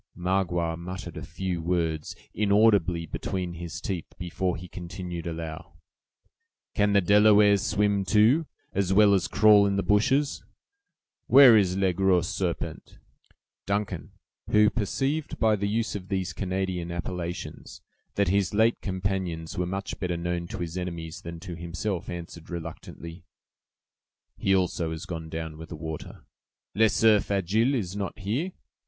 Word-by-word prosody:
Magua 90 -2 0
muttered 90 +2 -7
a - - -6
few 90 -3 -4
words, 80 -3 -1 0.2
inaudibly, 100 -4 +3
between 90 +2 -4
his 85 -5 -6
teeth, 90 -5 -5
before 90 -1 -2
he 90 +3 -9
continued, 90 -1 -6
aloud: 80 0 -6 1.0
"Can 105 -1 +2
the 100 - +5
Delawares 105 +1 +5
swim, 100 -1 +1
too, 115 - +4 0.3
as 95 -1 0
well 100 +1 +6
as 90 -2 +2
crawl 105 -1 +6
in 100 - 0
the 100 - 0
bushes? 135 +8 +2 0.8
Where 135 -4 +9
is 95 -3 +3
'Le 95 -2 +2
Gros 90 -2 +2
Serpent'?" 90 -3 -4 0.7
Duncan, 100 -5 -2 0.4
who 105 0 +5
perceived 135 +8 -2
by 110 -1 +3
the 100 0 -2
use 110 +2 -1
of 95 -3 -6
these 95 -2 -2
Canadian 90 -1 -2
appellations, 85 0 -6 0.3
that 100 -3 +2
his 100 0 +1
late 110 +2 +3
companions 95 -4 -3
were 90 -1 -1
much 95 +2 -4
better 90 -2 -2
known 85 0 -3
to 110 - -6
his 85 +1 -4
enemies 85 -1 -6
than 85 -1 -7
to 90 -2 -7
himself, 85 +3 -4
answered, 85 -1 -8
reluctantly: 85 0 -8 1.1
"He 95 - +2
also 90 -3 0
is 80 +2 -6
gone 80 -3 -6
down 80 -1 -6
with 80 -1 -9
the - - -6
water." 80 0 -7 0.5
"'Le 110 +3 +4
Cerf 110 -2 +3
Agile' 105 +7 +1
is 100 -6 -3
not 100 -1 -4
here?" 120 - -2
95 Hz, 145 wpm, -27 LUFS, 85-100 Hz, 1.1 s, Where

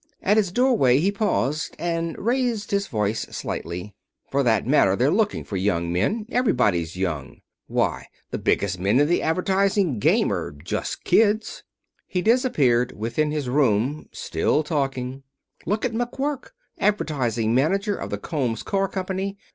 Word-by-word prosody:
At 205 +2 +3
his 200 -5 +2
doorway 210 - +4
he 185 +7 +2
paused 170 - -1
and 165 -1 -2
raised 235 -2 -1
his 200 0 0
voice 105 -1 -1
slightly: 90 +4 -5 0.4
"For 140 - +2
that 115 -5 +2
matter, 110 -8 +4
they're 130 +7 +2
looking 210 +2 +1
for 100 - -4
young 85 -3 0
men. 205 - 0
Everybody's 105 - +1
young. 80 -8 -3 0.3
Why, - - -1 0.2
the - - -3
biggest 95 -3 0
men 100 +7 +2
in 145 - +4
the 175 - +2
advertising 190 - +1
game - - +3
are - - -3
just 75 +4 -4
kids." 215 0 +2 0.5
He 180 -1 -2
disappeared 145 - +2
within 115 +8 -1
his 150 -3 -2
room, 130 +1 +1
still 155 - 0
talking. 135 -4 -2 0.5
"Look 210 +6 0
at 245 - -1
McQuirk, 265 +4 -2 0.3
advertising 120 - 0
manager 195 - +1
of - - -6
the - - -2
Combs 125 -9 -2
Car 195 0 0
Company. 190 +1 -3
150 Hz, 145 wpm, -24 LUFS, -, 0.5 s, doorway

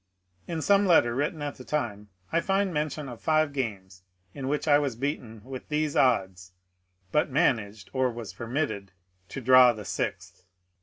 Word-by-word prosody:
In 165 -3 -3
some 200 +2 +4
letter 140 -9 +5
written 145 +4 -2
at 145 -1 -4
the 130 - -10
time, 110 -8 -3 0.2
I 170 - +2
find 195 0 0
mention 150 -1 -2
of 120 -3 -9
five 155 -2 +2
games 95 -9 -4 0.3
in 135 -1 -5
which 150 +3 -1
I 145 -1 +6
was 140 -5 -2
beaten 115 -5 -4
with 130 +1 -9
these 150 -1 -1
odds, 95 -7 +1 0.6
but 150 - +2
managed 110 - 0
(or 130 -1 +2
was 115 -5 -7
permitted) 115 -3 -3 0.4
to 135 - -6
draw 130 0 +7
the 105 -2 -9
sixth. - - -4
130 Hz, 165 wpm, -27 LUFS, 110-150 Hz, 0.6 s, draw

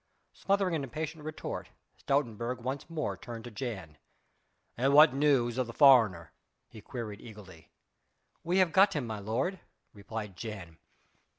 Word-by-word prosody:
Smothering 195 -2 0
an 155 -3 -1
impatient 155 +4 -5
retort 155 0 -6 0.3
Stoutenburg 120 -3 -1
once 130 +6 -5
more 160 -2 -3
turned 115 -2 -9
to 120 - -9
Jan. 95 - -6 0.8
"And 135 +4 +2
what 150 -2 +8
news 135 -4 +2
of 125 - 0
the 115 - -8
foreigner?" 115 - +5 0.3
he 110 - -13
queried 110 -5 -7
eagerly. 100 -7 -13 0.7
"We 175 +3 0
have 185 -3 +4
got 195 +1 +5
him, 145 -5 -1
my 110 -2 -5
lord," 125 - -2 0.3
replied 105 -1 -7
Jan. 95 -6 -8
120 Hz, 140 wpm, -30 LUFS, 110-150 Hz, 0.8 s, what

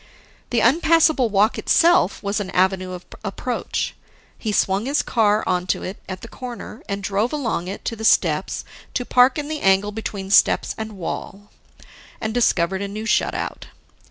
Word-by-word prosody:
The 235 -2 +1
unpassable 310 -1 +4
walk 210 +2 +2
itself 345 -5 +3
was 200 +1 -1
an 200 -2 -4
avenue 185 0 +1
of 180 0 -8 0.2
approach. 220 +4 -3 0.4
He 220 - -3
swung 200 +2 +1
his 285 +2 +1
car 215 -2 +2
onto 180 0 0
it 190 - -6
at 185 -1 -6
the - - -9
corner, 240 -2 -8
and 200 0 -3
drove 200 +4 0
along 235 - -2
it 195 - -7
to 230 - -2
the 220 - -8
steps 220 - +2 0.3
to 245 - -1
park 250 +3 +4
in 295 -1 -3
the 305 -1 -4
angle 195 +2 +3
between 200 -3 -5
steps - - +4
and 220 -1 -6
wall 200 +3 -6 0.7
and 220 -1 -3
discovered 190 -6 +1
a 200 - -2
new 215 +2 -6
shut - - +1
out. - - -5
215 Hz, 170 wpm, -22 LUFS, 195-245 Hz, 0.7 s, unpassable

